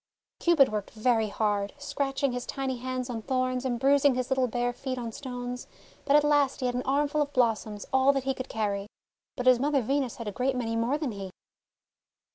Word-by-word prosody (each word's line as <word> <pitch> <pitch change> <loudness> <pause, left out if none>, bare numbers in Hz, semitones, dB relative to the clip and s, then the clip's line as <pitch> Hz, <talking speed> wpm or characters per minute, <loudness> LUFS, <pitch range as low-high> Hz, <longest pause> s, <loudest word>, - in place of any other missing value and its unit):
Cupid 325 -6 +5
worked 210 -2 -3
very 225 0 +1
hard, 205 -1 -1
scratching 280 -1 -1
his 245 0 -4
tiny 265 -2 -2
hands 255 0 -3
on 235 -3 -4
thorns, 255 +1 -1
and 245 -2 -1
bruising 280 0 +4
his 255 +1 -2
little 260 -1 +2
bare 245 +1 -1
feet 255 +1 -4
on 235 -2 -4
stones, 250 0 -6 0.4
but 280 - +4
at 295 - +6
last 290 -2 +2
he 255 - -2
had 250 - 0
an 250 - -1
armful 290 +2 +1
of 290 -1 -1
blos 235 -4 +2
soms, 210 -2 -7
all 265 +1 +5
that 270 -2 -1
he 270 0 0
could 255 0 -7
carry. 205 -2 -2 0.5
But 250 - -3
his 255 -1 +6
mother 280 -1 +1
Venus 270 0 0
had 230 - -7
a - - -2
great 255 +5 0
many 230 -2 -2
more 235 +5 +1
than 295 -5 -2
he. 195 -2 -6
255 Hz, 215 wpm, -28 LUFS, 230-275 Hz, 0.5 s, at